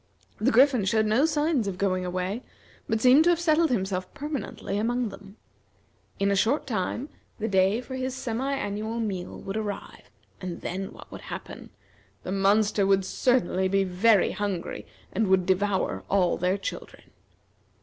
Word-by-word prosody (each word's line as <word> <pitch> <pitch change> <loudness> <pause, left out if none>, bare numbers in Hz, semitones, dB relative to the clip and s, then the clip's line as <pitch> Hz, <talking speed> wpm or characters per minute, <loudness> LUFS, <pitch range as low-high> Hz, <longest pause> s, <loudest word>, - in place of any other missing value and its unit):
The 220 +5 +3
Griffin 255 -2 +5
showed 215 +3 +2
no 230 +8 +3
signs 300 -7 +1
of 190 -2 -3
going 185 -2 0
away, 185 +5 -2 0.5
but 220 - +1
seemed 255 +6 +6
to - - +5
have 345 -1 +3
settled 330 -1 +3
himself 190 -5 -1
permanently 285 -8 -4
among 240 +1 0
them. 200 +1 -13 0.8
In 200 0 +1
a - - +2
short 255 +10 +2
time, 230 +2 -2 0.3
the 220 - -2
day 195 +3 +2
for 260 - -9
his 260 0 -3
semi 260 +1 -2
annual 220 -3 -3
meal 195 -6 -4
would 195 - -6
arrive, 205 -2 -6 0.3
and 180 -2 -5
then 190 +2 -4
what - - -14
would - - -8
happen? - - -8 0.5
The - - -5
monster 200 +1 +3
would 195 -1 +3
certainly 190 -8 +1
be 195 +1 +2
very 195 +3 +3
hungry, 200 -4 -4 0.3
and 215 +2 +1
would 190 -1 +3
devour 190 +1 0
all 185 -3 +3
their 180 +2 0
children. 195 - -7
205 Hz, 160 wpm, -26 LUFS, 190-250 Hz, 0.8 s, seemed